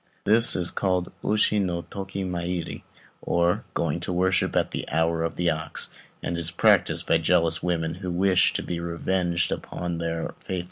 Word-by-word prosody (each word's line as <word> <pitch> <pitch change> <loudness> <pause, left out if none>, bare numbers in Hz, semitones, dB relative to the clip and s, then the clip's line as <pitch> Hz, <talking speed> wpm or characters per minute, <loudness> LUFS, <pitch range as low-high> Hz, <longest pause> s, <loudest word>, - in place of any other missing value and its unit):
This 115 +3 +6
is 90 -1 +1
called 90 -2 -1
Ushi 105 0 +2
no 85 -3 -2
toki 95 0 -6
mairi, 90 -1 -4 0.4
or 85 0 +1
"going 85 -1 -1
to 85 - -4
worship 90 +1 +1
at - - +1
the - - -5
hour 80 0 +1
of 85 - -3
the 85 -1 +1
ox," 80 0 -4 0.3
and 85 - -2
is 85 -1 +2
practised 85 - +3
by - - +3
jealous 80 0 +3
women 80 -2 -1
who 90 +2 -6
wish 95 +1 +3
to - - -2
be 85 - -4
revenged 85 +1 -1
upon 85 -1 -4
their 85 -1 -2
faithless - - -24
lovers. 95 - -1
85 Hz, 180 wpm, -25 LUFS, 85-95 Hz, 0.4 s, This